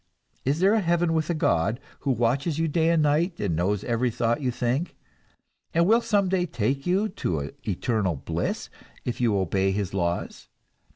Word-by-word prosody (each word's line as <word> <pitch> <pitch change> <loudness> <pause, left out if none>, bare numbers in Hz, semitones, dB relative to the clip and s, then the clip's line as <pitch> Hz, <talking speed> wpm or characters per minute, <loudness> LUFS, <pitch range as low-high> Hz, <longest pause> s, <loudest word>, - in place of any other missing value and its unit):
Is 140 +4 +1
there 195 +3 +5
a 225 - +4
heaven 175 -2 +1
with 160 0 0
a 170 - +1
God, 110 - +1 0.2
who 140 - -3
watches 130 +6 +1
you 165 0 +1
day 160 +2 +2
and 165 -2 +3
night, 160 +5 +1
and 95 -6 0
knows 95 +4 0
every 120 +1 0
thought 115 +3 0
you 130 - 0
think, 125 +7 -1 0.8
and 170 +1 +4
will 225 +5 +5
some 205 -4 +2
day 180 -1 +1
take 135 +3 -1
you 195 +4 +2
to 80 - -3 0.2
eternal 100 -2 0
bliss 65 - -3 0.3
if 125 0 -3
you 115 -4 +3
obey 95 +1 +1
his 100 -1 -2
laws? 85 -2 -2
130 Hz, 180 wpm, -26 LUFS, 105-170 Hz, 0.8 s, there